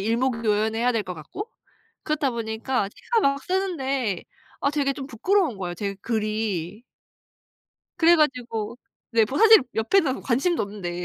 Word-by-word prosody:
일목요연해야 230 Hz, 0 st, +1 dB
될 225 Hz, -, 0 dB
것 180 Hz, -1 st, -5 dB
같고 265 Hz, -, -7 dB, 0.6 s
그렇다 300 Hz, -3 st, 0 dB
보니까 225 Hz, -1 st, -2 dB
제가 460 Hz, -, -1 dB
막 275 Hz, 0 st, +1 dB
쓰는데 275 Hz, -, -1 dB, 0.4 s
아 280 Hz, -, +2 dB
되게 285 Hz, -2 st, 0 dB
좀 270 Hz, 0 st, -7 dB
부끄러운 315 Hz, -, +1 dB
거예요, 175 Hz, -2 st, -4 dB
제 200 Hz, +2 st, -3 dB
글이. 215 Hz, -3 st, -2 dB, 1.1 s
그래 340 Hz, 0 st, +6 dB
가지고 245 Hz, -8 st, -1 dB, 0.3 s
네 230 Hz, -2 st, +4 dB
뭐 275 Hz, -, -2 dB
사실 445 Hz, +1 st, +9 dB, 0.2 s
옆에는 265 Hz, -, +1 dB
관심도 275 Hz, +8 st, +1 dB
없는데. 180 Hz, -4 st, -5 dB
235 Hz, 295 characters per minute, -24 LUFS, 215-285 Hz, 1.1 s, 사실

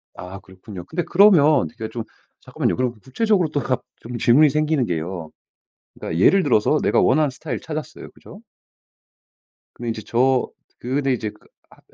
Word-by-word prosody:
아. 95 Hz, +2 st, -9 dB
그렇군요. 95 Hz, -1 st, -11 dB
근데 170 Hz, -, -3 dB
그러면 165 Hz, -7 st, +5 dB
이게 115 Hz, -2 st, -7 dB
좀 115 Hz, 0 st, -5 dB, 0.4 s
잠깐만요. -, -, -2 dB
그럼 125 Hz, -1 st, -1 dB
구체적으로 185 Hz, -, +1 dB
또 145 Hz, -, -1 dB
갑 130 Hz, -, -1 dB, 0.2 s
좀 120 Hz, +1 st, -7 dB
질문이 140 Hz, +7 st, +5 dB
생기는 150 Hz, -3 st, 0 dB
게요. 85 Hz, -2 st, -4 dB, 0.6 s
그러니까 80 Hz, -, -4 dB
예를 195 Hz, -1 st, +5 dB
들어서 130 Hz, +2 st, +2 dB
내가 -, -, +3 dB
원하는 150 Hz, -3 st, +2 dB
스타일을 140 Hz, -3 st, -6 dB
찾았어요 155 Hz, -1 st, -7 dB
그죠? -, -, -15 dB, 1.3 s
근데 120 Hz, -, -8 dB
인제 110 Hz, -1 st, -4 dB
저 130 Hz, +2 st, +1 dB, 0.3 s
그 125 Hz, +2 st, -4 dB
근데 135 Hz, -2 st, +1 dB
인제 110 Hz, -3 st, -3 dB
그 -, -, -24 dB, 0.2 s
안 -, -, -21 dB
130 Hz, 355 characters per minute, -21 LUFS, 110-155 Hz, 1.3 s, 그러면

